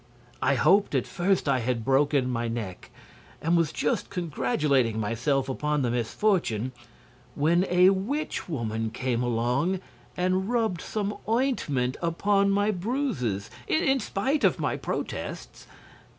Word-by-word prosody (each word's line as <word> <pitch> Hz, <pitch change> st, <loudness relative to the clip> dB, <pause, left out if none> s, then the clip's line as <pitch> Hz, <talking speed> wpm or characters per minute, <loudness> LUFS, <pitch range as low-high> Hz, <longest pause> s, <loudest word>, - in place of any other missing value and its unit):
I 140 Hz, -, +3 dB
hoped 195 Hz, -, +3 dB
at -, -, +1 dB
first 185 Hz, -2 st, 0 dB
I 135 Hz, -2 st, +3 dB
had 120 Hz, -2 st, -2 dB
broken 135 Hz, 0 st, +3 dB
my 120 Hz, -2 st, -1 dB
neck, 115 Hz, -6 st, -5 dB, 0.5 s
and 165 Hz, +2 st, +1 dB
was 165 Hz, -2 st, +2 dB
just -, -, -1 dB
congratulating 135 Hz, -7 st, 0 dB
myself 120 Hz, +5 st, 0 dB
upon 150 Hz, +2 st, -1 dB
the 120 Hz, -, 0 dB
misfortune, 125 Hz, -, 0 dB, 0.6 s
when 170 Hz, +5 st, +2 dB
a 180 Hz, +1 st, +6 dB
witch 215 Hz, +7 st, -2 dB
woman 115 Hz, -6 st, -2 dB
came 120 Hz, +1 st, -2 dB
along 125 Hz, +10 st, 0 dB, 0.4 s
and 185 Hz, +2 st, +1 dB
rubbed 225 Hz, -8 st, 0 dB
some 210 Hz, -1 st, -3 dB
ointment 185 Hz, -, 0 dB
upon 200 Hz, +4 st, +2 dB
my 205 Hz, +2 st, +2 dB
bruises, 180 Hz, -, -2 dB, 0.2 s
in 270 Hz, -4 st, +2 dB
spite 260 Hz, +7 st, -1 dB
of -, -, +4 dB
my -, -, 0 dB
protests. -, -, -5 dB
150 Hz, 130 wpm, -27 LUFS, 125-195 Hz, 0.6 s, a